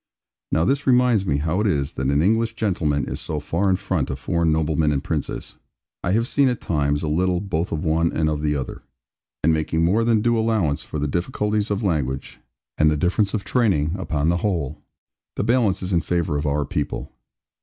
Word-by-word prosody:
Now 80 - +2
this 140 +7 0
reminds 125 -6 +4
me 70 - +1
how 80 +5 0
it 110 - +1
is 70 -7 0
that 65 - -2
an 70 +2 +2
English 115 +4 +1
gentleman 80 -9 0
is - - -5
so 75 - -3
far 85 +7 0
in 95 - +4
front - - -2
of 65 - -3
foreign 80 +5 0
noblemen 80 -1 +1
and 70 -1 -1
princes. 75 -3 -4 0.5
I 90 - +1
have 115 +3 +1
seen 140 +1 +3
at 125 -2 0
times, 75 -2 0
a - - -1
little, 90 +3 +1
both 90 -3 -2
of 80 -1 -2
one 80 +1 +2
and 80 -1 0
of 75 -1 -1
the 75 -1 0
other, 65 -3 -5 0.6
and 80 +2 +4
making 80 +1 0
more 105 +7 +2
than 115 -2 +2
due 120 -1 +2
allowance 100 -10 +1
for - - -6
the 75 0 -1
difficulties 105 - -1
of 105 +2 -1
language, 70 -8 -2 0.4
and 75 - +5
the 75 - +1
difference 95 +6 +1
of 100 - -2
training, 95 - +1
upon 80 -5 -1
the 85 - +2
whole, 85 -8 -2 0.5
the - - -1
balance 110 -5 +2
is 90 +1 -2
in 85 - +3
favour 85 -3 -1
of 75 +1 -1
our 70 0 0
people. - - -3
85 Hz, 210 wpm, -22 LUFS, 75-105 Hz, 0.6 s, and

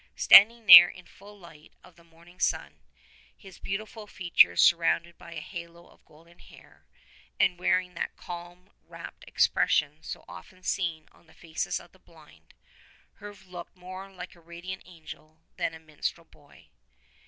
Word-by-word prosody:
Standing 230 +3 +6
there 175 -3 +11
in 185 - -14
the - - -21
full 205 +1 -16
light 165 -5 -17
of 180 -2 -19
the 170 - -22
morning 170 +2 -22
sun, 75 - -2 0.6
his 190 -2 -16
beautiful 215 +2 -7
features 175 -4 +2
surrounded 170 0 +2
by 170 - -13
a 165 - -6
halo 170 +1 -11
of - - -25
golden 165 +3 -22
hair, - - -19 0.5
and 185 -3 +1
wearing 180 0 0
that 170 - -6
calm, 175 +2 -11 0.2
rapt - - -12
expression 150 +1 0
so - - -9
often 185 0 -14
seen 165 -6 -3
on - - -26
the 160 - -22
faces 165 -2 -4
of - - -18
the - - -24
blind, - - -22 0.6
Herve 205 -2 -12
looked 180 -1 -11
more 185 +2 -10
like 180 -2 -10
a 170 - -21
radiant 170 +3 -9
angel 160 -2 -14
than 160 - -3
a - - -12
minstrel 160 +1 -6
boy. 145 -3 -23
175 Hz, 160 wpm, -27 LUFS, 165-185 Hz, 0.6 s, there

